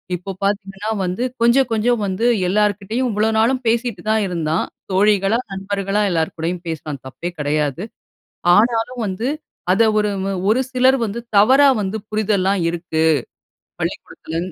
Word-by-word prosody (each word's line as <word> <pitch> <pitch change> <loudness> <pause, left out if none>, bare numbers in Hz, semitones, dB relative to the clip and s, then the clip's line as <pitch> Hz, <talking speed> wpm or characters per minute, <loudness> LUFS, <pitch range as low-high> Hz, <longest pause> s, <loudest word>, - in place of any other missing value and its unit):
இப்போ 180 +3 -6
பார்த்தீங்கன்னா 200 +1 -2 0.2
வந்து, 185 +7 -2 0.2
கொஞ்சம் 240 +3 +4
கொஞ்சம் 230 +1 +1
வந்து 195 +4 -1 0.2
எல்லார்கிட்டேயும் 210 +5 0
இவ்வளோ 215 +1 +1
நாளும் 250 +4 +2
பேசிட்டு 230 -4 0
தான் 220 -1 +2
இருந்தான், 165 -2 -1 0.3
தோழிகளா 200 +2 +3
நண்பர்களா 195 +1 -2
எல்லார் 160 -2 -1
கூடயும் 170 +2 -3
பேசினான் 155 -4 -5
தப்பே 150 +6 -5
கெடையாது. 150 +2 -1 0.7
ஆனாலும் 235 +3 +1
வந்து 200 +6 -2 0.4
அத 195 +5 +4 0.2
ஒரு 210 0 +1 0.4
ஒரு 225 +5 +3
சிலர் 260 +1 +4
வந்து 225 0 -2 0.2
தவறா 260 +8 +6
வந்து 200 +1 -2
புரிதல்லாம் 200 -3 +1
இருக்கு. 165 -1 -2 0.8
பள்ளிக்கூடத்துல 160 - -5
200 Hz, 130 wpm, -19 LUFS, 180-225 Hz, 0.8 s, தவறா